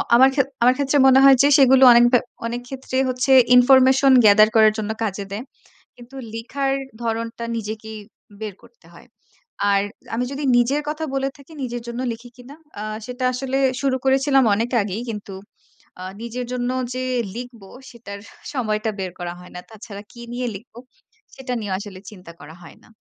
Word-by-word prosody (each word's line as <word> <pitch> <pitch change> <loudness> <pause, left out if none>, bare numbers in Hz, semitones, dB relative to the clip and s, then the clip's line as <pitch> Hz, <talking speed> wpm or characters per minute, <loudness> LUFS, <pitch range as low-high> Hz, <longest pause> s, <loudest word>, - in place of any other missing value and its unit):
আমার 260 +2 +6
খে 275 - +4 0.2
আমার 250 +1 +5
ক্ষেত্রে 285 0 +1
মনে 265 0 +6
হয় 275 -1 +8
যে, 280 - +5
সেগুলো 265 -1 +5
অনেকবা 240 +1 +5 0.3
অনেকক্ষেত্রে 245 +3 -5
হচ্ছে 255 +1 -1 0.2
information 265 +2 +5
gather 215 +1 +7
করার 220 -1 +5
জন্য 215 0 -3
কাজে 200 -1 -3
দেয়। 210 +4 -5 0.5
কিন্তু 245 +2 -16 0.2
লিখার 270 +4 -3 0.3
ধরনটা 230 0 -4
নিজেকেই 220 0 -6 0.4
বের 215 -3 -6
করতে 475 0 -22
হয়। - - -16 0.7
আর 200 0 +2 0.3
আমি 240 +2 -1
যদি 285 +1 -5
নিজের 260 +5 +1
কথা 310 +1 -4
বলে 270 0 -1
থাকি, 280 +2 -17
নিজের 240 -2 -5
জন্য 235 +1 -5
লিখি 235 +2 -11
কিনা? 250 +3 -13 0.3
আ - - -5 0.2
সেটা 250 +1 -5
আসলে 265 +1 -3 0.2
শুরু 270 -2 0
করেছিলাম 270 0 +3
অনেক 230 +4 -2
আগেই। 200 +3 -5
কিন্তু 205 -2 -8 0.7
আ - - -7 0.2
নিজের 240 +1 -5
জন্য 245 0 -2 0.2
যে 255 - -3 0.3
লিখবো, 240 -5 -9 0.2
সেটার 210 -5 -10
হা - - -20 0.2
সময়টা 220 -4 -1
বের 185 -1 -4
করা 175 -1 -5
হয় 180 - -14
না। 180 - -7
তাছাড়া 210 -2 -10
কি 235 - -13
নিয়ে 250 +1 -3
লিখবো? 225 +3 -15 0.6
সেটা 265 -1 -7
নিয়েও 205 -3 -4
আসলে 200 -2 -10
চিন্তা 180 -5 -13
করা 150 +2 -12
হয় 165 - -14
না। - - -21
240 Hz, 170 wpm, -21 LUFS, 215-265 Hz, 0.7 s, হয়